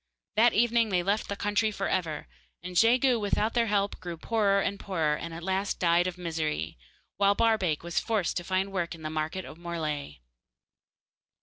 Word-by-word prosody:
That 230 +2 +5
evening 235 0 +3
they 180 -3 +1
left 200 +3 0
the 200 - -2
country 205 +2 +1
for 200 -2 -3
ever, 160 - -2 0.4
and 180 0 -7
Jegu, 240 +4 +4
without 210 +1 0
their 235 -1 +2
help, 200 -1 0
grew 175 -2 -6
poorer 200 +1 +2
and 200 0 -1
poorer, 165 -6 0
and 170 +2 -6
at 165 +1 -7
last 190 +2 -1
died 175 0 +3
of 180 -1 -4
misery, 155 - -2 0.4
while 200 0 +4
Barbaik 205 -10 +2
was 170 +1 0
glad 215 -5 0
to 175 - -1
find 190 +2 -1
work 175 -3 -2
in 160 - -13
the 155 - -3
market 160 +4 -3
of 160 - -11
Morlaix. 155 - -4
190 Hz, 185 wpm, -28 LUFS, 170-210 Hz, 0.4 s, That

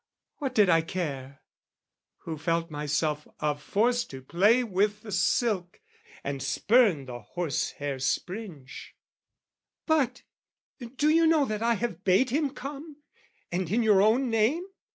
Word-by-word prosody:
What 270 -3 -4
did 210 -3 +5
I 165 -2 +4
care? 140 -6 -5 0.8
who 165 - -4
felt 165 +2 -1
myself 150 0 -1
of 150 -1 -1
force 240 +8 +1
To 135 - -9
play 205 - +3
with 205 0 0
the 215 - -9
silk, 190 -1 0 0.4
and 140 -1 -4
spurn 205 - +3
the 125 -2 -7
horsehair 145 +1 -3
springe. 175 - -3 1.2
"But 315 -6 +1 0.7
do 300 - +3
you 325 +1 +4
know 315 -3 +4
that 215 -3 -3
I 235 0 +2
have 205 -5 -4
bade 195 +7 +3
him 290 +1 +1
come, 285 +2 -9 0.5
"And 175 -1 -2
in 230 +5 +1
your 210 -3 +5
own 235 +4 +3
name? 230 +11 +1
200 Hz, 135 wpm, -27 LUFS, 155-245 Hz, 1.2 s, did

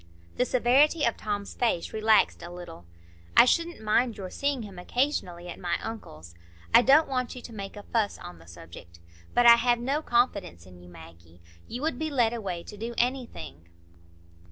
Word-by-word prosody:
The 250 - +2
severity 270 +6 +3
of 235 - +1
Tom's 205 -1 -4
face 230 -8 -1
relaxed 220 0 +3
a 170 - -8
little. 175 - -10 0.5
"I - - +9
shouldn't 335 0 0
mind 220 +2 +1
your 185 -2 -7
seeing 280 -4 -2
him 195 -4 -10
occasionally 180 -6 -2
at 175 - -8
my 175 -1 -1
uncle's—I 85 - -2
don't 285 +5 +5
want 255 -2 -2
you 250 - -8
to 230 - -10
make 195 -2 -7
a 205 - -9
fuss 220 -2 -1
on 90 -1 -11
the 80 - -18
subject. 85 0 -13 0.4
But 245 - +4
I 235 0 +9
have 240 0 +2
no 270 +6 -1
confidence 205 - 0
in 90 -1 -15
you, 90 - -14
Maggie. 85 0 -15 0.3
You 245 +4 -6
would 320 0 -1
be 315 0 -2
led 240 -5 +1
away 190 -7 -4
to 210 - -11
do 230 +3 -6
anything." 240 - -3
220 Hz, 180 wpm, -27 LUFS, 170-250 Hz, 0.5 s, I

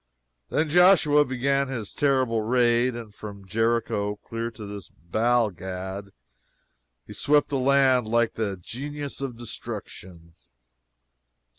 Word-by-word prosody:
Then 155 - +1
Joshua 155 -3 +5
began 140 +1 0
his 120 -6 -5
terrible 130 -5 +1
raid, 120 +1 +2
and 115 -3 -8
from 100 -2 -9
Jericho 110 0 0
clear 115 +2 -5
to 110 -2 -10
this 100 -1 -8
Baal 110 +5 +1
Gad, 95 +2 -6 1.0
he - - -10
swept 145 0 +2
the 140 -2 -1
land 130 -3 +3
like 120 +1 +2
the 100 -4 -2
Genius 140 +9 -6
of 130 -4 -4
Destruction. 90 -7 -8
120 Hz, 120 wpm, -25 LUFS, 105-135 Hz, 1.0 s, Joshua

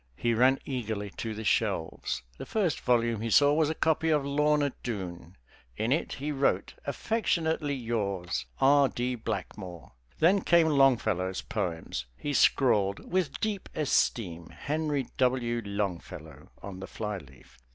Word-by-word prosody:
He 120 - 0
ran 130 +4 +4
eagerly 110 -6 -3
to 110 -2 -4
the 110 - -5
shelves. 95 - -1 0.2
The - - -5
first 190 - 0
volume 115 -3 +1
he 115 - -2
saw 145 +5 +5
was 155 0 +2
a 160 - -2
copy 160 +1 +1
of 150 -3 +2
"Lorna 145 0 +2
Doone." 95 -6 -6 0.4
In 115 +3 0
it 155 - 0
he 145 +2 -3
wrote 140 -1 0
"Affectionately 160 -9 0
yours, 100 -7 -2
R. 140 0 +5
D. 125 +1 -2
Blackmore." 90 -7 -6 0.3
Then 190 +5 +4
came 170 -3 +4
Longfellow's 110 - +2
poems. 85 - -3
He 145 - -3
scrawled 105 -8 +2
"With 180 -6 0
deep 210 -3 -2
esteem, 95 - 0
Henry 150 -2 -2
W. 125 -2 +1
Longfellow" 90 -7 -5
on 95 -2 -7
the 95 - -7
flyleaf. 90 - -7
120 Hz, 140 wpm, -29 LUFS, 100-145 Hz, 0.4 s, saw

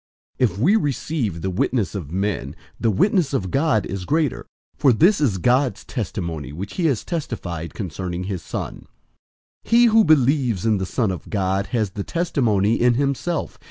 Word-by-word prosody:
005:009 125 - +4
If 90 - -11
we 165 - +4
receive 135 - -2
the 95 - 0
witness 100 0 0
of 85 -8 -6
men, 95 -7 -2 0.2
the 115 - +2
witness 160 - +2
of 95 -8 -2
God 140 -7 +2
is 95 -1 -5
greater; 155 - 0 0.3
for 140 -3 +4
this 170 - +4
is 115 -10 +2
God's 125 +7 +1
testimony 85 - -4
which 90 +7 -6
he 175 -3 +2
has 130 -8 0
testified 90 - -5
concerning 90 -1 -4
his 95 -2 -4
Son. - - -6 0.8
005:010 - - -17
He 235 +1 +6
who 225 -1 +5
believes 135 - +3
in 110 -3 +2
the 95 - -2
Son 110 -3 0
of 90 -4 -7
God 95 -1 0
has 110 -6 -1
the 100 +1 -4
testimony 115 - +1
in 120 0 +4
himself. 140 +4 -2
115 Hz, 175 wpm, -22 LUFS, 95-145 Hz, 0.8 s, He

